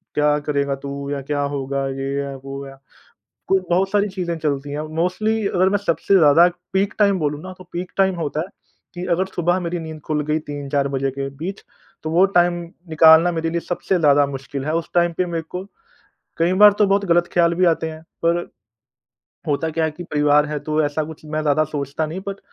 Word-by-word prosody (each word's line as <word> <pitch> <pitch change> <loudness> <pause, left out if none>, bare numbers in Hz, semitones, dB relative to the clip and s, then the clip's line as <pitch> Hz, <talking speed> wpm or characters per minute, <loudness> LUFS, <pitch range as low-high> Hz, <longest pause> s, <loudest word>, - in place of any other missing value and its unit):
क्या 150 0 +3
करेगा 140 -1 0
तू? 140 +1 -6
या 140 - -2
क्या 145 +1 -2
होगा? 140 -1 -2
ये 135 +1 -3
है, 140 -1 -6
वो 135 +1 -7
है। 135 0 -11 0.8
क 190 -1 +3
बहुत 190 +2 +2
सारी 205 0 +2
चीजें 180 -3 -3
चलती 145 -2 -2
है। 150 +2 -3
मोस्टली 215 +6 0
अगर 185 0 +2
मैं 205 - +2
सबसे 195 0 0
ज़्यादा 160 +2 +6 0.3
पीक 195 +1 +1
टाइम 200 -2 +3
बोलूँ 150 -1 -2
ना 185 - -8
तो 185 - -12
पीक 180 +1 -5
टाइम 190 -1 +3
होता 155 -2 -2
है 165 - -3 0.5
कि 175 0 -5
अगर 185 +3 +2
सुबह 175 +2 +1
मेरी 175 0 -3
नींद 160 -1 -8
खुल 150 -1 0
गई 155 +1 +1
3-4 140 -1 -1
बजे 135 0 -1
के 135 0 -4
बीच 185 +6 -6 0.4
तो 155 - -3
वो 175 +4 +5
टाइम 175 0 +3 0.3
निकालना 160 +2 +6
मेरे 165 -1 -2
लिए 170 +1 -1
सबसे 180 +1 -1
ज़्यादा 145 -2 +5
मुश्किल 135 0 -6
है। 155 - 0
उस 165 - -4
टाइम 175 -1 +3
पे 185 - +1
मेरे 165 -2 -3
को 180 +1 -5 0.7
कई 170 +2 +2
बार 210 - +10
तो 205 - +5
बहुत 200 0 +2
गलत 175 0 +3
ख़्याल 170 -1 +3
भी 185 - +3
आते 160 -1 +1
हैं। 155 - -10 0.2
पर 170 +1 +3 1.1
होता 150 +2 0
क्या 160 0 0
है 155 - -2
कि 175 +4 -9
परिवार 150 -2 +3
है 150 0 -3
तो 155 +1 0
ऐसा 145 +2 -1
कुछ 155 0 -10
मैं 155 0 -2
ज़्यादा 150 +1 +3
सोचता 140 +2 -2
नहीं 165 +5 -5
बट 200 0 -4
160 Hz, 215 wpm, -21 LUFS, 145-175 Hz, 1.1 s, बार